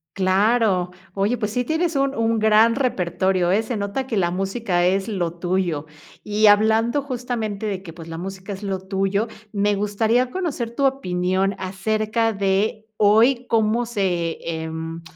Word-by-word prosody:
Claro. 195 Hz, -1 st, +2 dB, 0.2 s
Oye, 205 Hz, +5 st, 0 dB
pues 210 Hz, -2 st, -2 dB
sí 245 Hz, -, 0 dB
tienes 320 Hz, +4 st, -1 dB
un 275 Hz, 0 st, +1 dB
un 230 Hz, 0 st, +1 dB
gran 220 Hz, +2 st, +5 dB
repertorio, 185 Hz, -, 0 dB
¿eh?, 210 Hz, +4 st, +2 dB
se 230 Hz, 0 st, -3 dB
nota 200 Hz, +6 st, -2 dB
que 225 Hz, -, -2 dB
la 175 Hz, -3 st, +1 dB
música 190 Hz, -1 st, 0 dB
es 190 Hz, +2 st, +1 dB
lo 180 Hz, -6 st, -2 dB
tuyo. 175 Hz, -4 st, -1 dB, 0.4 s
Y 210 Hz, +1 st, +2 dB
hablando 220 Hz, +5 st, +4 dB
justamente 240 Hz, -6 st, -4 dB
de 195 Hz, -2 st, -3 dB
que, 165 Hz, -4 st, -9 dB
pues, 165 Hz, -1 st, -11 dB
la 165 Hz, -, -6 dB
música 190 Hz, +3 st, -7 dB
es 195 Hz, +2 st, -9 dB
lo 195 Hz, -2 st, -2 dB
tuyo, 195 Hz, +3 st, -1 dB, 0.3 s
me 205 Hz, 0 st, +1 dB
gustaría 220 Hz, +5 st, +1 dB
conocer 265 Hz, -9 st, -3 dB
tu 280 Hz, -, +1 dB
opinión 190 Hz, -6 st, 0 dB
acerca 215 Hz, +4 st, -1 dB
de 200 Hz, +2 st, 0 dB, 0.2 s
hoy 230 Hz, +5 st, +4 dB
cómo 225 Hz, +1 st, +2 dB
se, 185 Hz, -7 st, -1 dB, 0.2 s
em, 160 Hz, +1 st, -5 dB
205 Hz, 160 wpm, -22 LUFS, 190-230 Hz, 0.4 s, gran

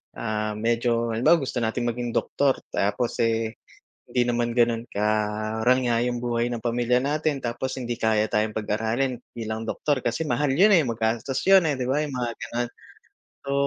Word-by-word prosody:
ah, 110 Hz, -1 st, -2 dB
medyo 115 Hz, +1 st, 0 dB
halimbawa 125 Hz, +10 st, +4 dB
gusto 130 Hz, -1 st, -2 dB
nating 115 Hz, +1 st, -1 dB
maging 120 Hz, 0 st, -4 dB
doktor 140 Hz, -2 st, +2 dB, 0.2 s
tapos, 105 Hz, +4 st, -1 dB
eh, 115 Hz, -1 st, 0 dB, 0.5 s
hindi 125 Hz, -, 0 dB
naman 120 Hz, 0 st, 0 dB
gano'n 115 Hz, -1 st, +2 dB
karangya 110 Hz, +3 st, +1 dB
yung 120 Hz, -1 st, -2 dB
buhay 120 Hz, 0 st, -1 dB
ng 120 Hz, -, -3 dB
pamilya 120 Hz, +1 st, +1 dB
natin 145 Hz, +1 st, -1 dB
tapos 130 Hz, +2 st, -3 dB
hindi 120 Hz, -1 st, -3 dB
kaya 110 Hz, -1 st, +1 dB
tayong 105 Hz, 0 st, 0 dB
pag-aralin 110 Hz, +5 st, -1 dB, 0.2 s
bilang 110 Hz, -1 st, -4 dB
doktor 135 Hz, +3 st, -1 dB
kasi 120 Hz, +7 st, -1 dB
mahal 135 Hz, +3 st, +1 dB
'yon, 195 Hz, +6 st, +6 dB
eh, 160 Hz, -, +4 dB
magastos 115 Hz, +3 st, -1 dB
'yon, 190 Hz, -3 st, +7 dB
eh, 145 Hz, -4 st, 0 dB
di 125 Hz, -, -1 dB
ba 150 Hz, +3 st, +1 dB
yung 145 Hz, -, -6 dB
mga 120 Hz, -2 st, -1 dB
gano'n. 120 Hz, 0 st, -3 dB, 0.8 s
So, 140 Hz, -, -2 dB
120 Hz, 165 wpm, -25 LUFS, 110-130 Hz, 0.8 s, yon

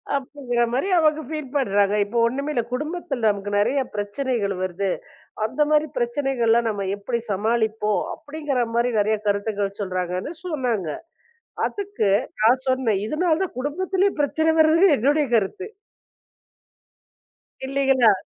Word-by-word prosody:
அப்படிங்கிற 260 Hz, -3 st, -2 dB
மாரி 270 Hz, +10 st, 0 dB
அவங்க 310 Hz, -1 st, +3 dB
ஃபீல் 305 Hz, -4 st, -5 dB
பண்றாங்க. 205 Hz, -5 st, +2 dB
"இப்ப 230 Hz, +4 st, -4 dB
ஒண்ணுமே 280 Hz, +5 st, -3 dB
இல்ல". 235 Hz, -, +1 dB
குடும்பத்துல 300 Hz, -4 st, -2 dB
நமக்கு 205 Hz, 0 st, -5 dB
நறைய 260 Hz, +6 st, +2 dB
பிரச்சனைகள் 205 Hz, -1 st, -1 dB
வருது 185 Hz, +1 st, -1 dB, 0.6 s
அந்த 260 Hz, +6 st, -7 dB
மாரி 305 Hz, 0 st, +3 dB
பிரச்சனைகல்லாம் 240 Hz, -2 st, +1 dB
நாம 200 Hz, -2 st, -3 dB
எப்படி 235 Hz, +4 st, -3 dB
சமாளிப்போம்? 220 Hz, 0 st, 0 dB
அப்படிங்கிற 290 Hz, -5 st, -2 dB
மாரி 240 Hz, +1 st, +2 dB
நறைய 215 Hz, +1 st, +1 dB
கருத்துகள் 200 Hz, -1 st, -1 dB
சொல்றாங்கன்னு 185 Hz, -, -3 dB
சொன்னாங்க. 245 Hz, -, -1 dB, 0.8 s
அதுக்கு 405 Hz, -, -2 dB, 0.3 s
நான் 245 Hz, +4 st, +4 dB
சொன்னேன், 245 Hz, -6 st, +1 dB
இதனாலதான் 335 Hz, +3 st, 0 dB
குடும்பத்திலேயே 375 Hz, +8 st, 0 dB
பிரச்சனை 315 Hz, +3 st, +2 dB
வரது 320 Hz, +4 st, +5 dB
என்னுடைய 290 Hz, +5 st, +2 dB
கருத்து. 225 Hz, -, -2 dB, 2.0 s
இல்லீங்களா? 270 Hz, -5 st, +4 dB
245 Hz, 115 wpm, -23 LUFS, 210-295 Hz, 2.0 s, வரது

